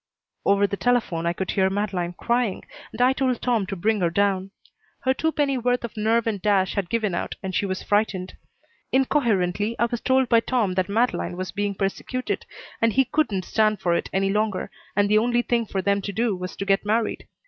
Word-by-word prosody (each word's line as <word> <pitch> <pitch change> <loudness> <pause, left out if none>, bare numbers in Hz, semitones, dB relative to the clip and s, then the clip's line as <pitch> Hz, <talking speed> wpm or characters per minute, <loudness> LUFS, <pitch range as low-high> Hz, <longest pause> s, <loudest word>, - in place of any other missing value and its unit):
Over 200 0 +4
the 200 0 -2
telephone 220 -10 +1
I 170 - +1
could 190 +1 -3
hear 190 -1 +2
Madeleine 190 -3 -2
crying 235 +1 -1 0.3
and - - -10
I 250 +1 +5
told 260 -3 0
Tom 230 -6 0
to 195 - -4
bring 210 +3 0
her 170 - +3
down. 195 +1 +1 0.5
Her 260 - +2
two 320 +4 0
penny 280 -4 0
worth 245 +1 0
of 235 - -6
nerve 225 +2 +1
and 210 -4 -2
dash 195 -2 +2
had 195 -4 -2
given 220 -5 0
out 175 - -3
and 190 -1 -4
she 200 - 0
was 185 0 -3
frightened. 200 -3 0 0.6
Incoherently 225 -6 +1
I 235 - +3
was 235 0 -3
told 260 0 +3
by 230 -1 +5
Tom 230 -5 0
that 185 +1 0
Madeleine 220 -4 0
was 185 0 -4
being 205 0 -2
persecuted, 205 +6 -3 0.3
and 230 -1 +3
he 265 -2 +3
wouldn't 205 - +1
stand 215 -1 +2
for 175 - +1
it - - -1
any 195 0 +1
longer, 210 -2 -1 0.2
and 205 0 +3
the 210 +1 +4
only 240 +1 +1
thing 235 -2 0
for 190 -1 -2
them 200 +1 +2
to 200 - -4
do 220 0 0
was 180 0 -6
to 195 - -4
get 195 0 +2
married. 220 +2 -1
210 Hz, 215 wpm, -24 LUFS, 190-235 Hz, 0.6 s, I